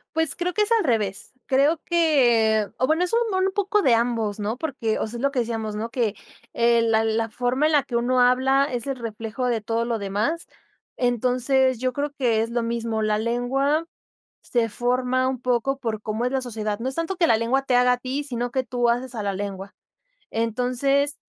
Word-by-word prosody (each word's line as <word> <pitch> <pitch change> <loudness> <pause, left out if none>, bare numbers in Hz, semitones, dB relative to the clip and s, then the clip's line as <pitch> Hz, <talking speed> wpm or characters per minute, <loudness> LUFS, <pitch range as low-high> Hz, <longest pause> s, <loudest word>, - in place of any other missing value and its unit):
Pues, 320 -2 0
creo 355 +1 -2
que 425 - +2
es 415 - -1
al 455 -2 +3
revés. 210 -6 -1
Creo 285 +5 +2
que 240 - +3
o 255 - +2
bueno, 320 +3 +2
es 360 - -1
un 465 - +4 0.2
m 375 +1 +2
un - - -4
poco 405 +1 +1
de 255 -5 +4
ambos, 230 -3 -1
¿no?, 215 +3 -2
porque 255 -7 -2
o - - -2
sea, 235 - -7
es - - -6
lo 280 0 +1
que 260 - 0
decíamos, 225 -2 -3
¿no?, 225 +2 -4
que, 230 -4 0 0.4
eh, 235 0 +3
la 225 -1 +2
la 225 0 0
forma 250 +5 0
en 315 - +1
la 295 -2 +4
que 240 - -4
uno 250 +2 +2
habla, 260 +2 +4
es 245 +1 -3
el 275 - -1
reflejo 230 +1 -4
de 230 -2 0
todo 225 +2 -1
lo 235 -1 -1
demás. 210 - -2 0.5
Entonces, 250 +1 +1
yo 255 0 0
creo 285 +2 -3
que 230 -4 +2
es 230 - -3
lo 235 0 -1
mismo. 230 -1 -2
La 215 0 +1
lengua 270 +7 0 0.6
se 235 -2 0
forma 250 +2 0
un 260 -2 -3
poco 255 +2 0
por 225 -5 -4
cómo 220 +3 -2
es 250 - 0
la 265 -1 0
sociedad. 215 -4 -3
No 250 +3 -2
es - - -6
tanto 330 +4 -2
que 345 -1 +3
la 225 - +4
lengua 245 +4 +1
te 260 -2 0
haga 250 0 +4
a - - +2
ti, 260 +3 -3
sino 245 -3 -3
que 260 +1 -1
tú 245 -1 +1
haces 250 +1 -2
a 220 - -3
la 200 -1 -1
lengua. 195 0 -6 0.6
Entonces 250 +5 0
245 Hz, 220 wpm, -24 LUFS, 225-270 Hz, 0.6 s, un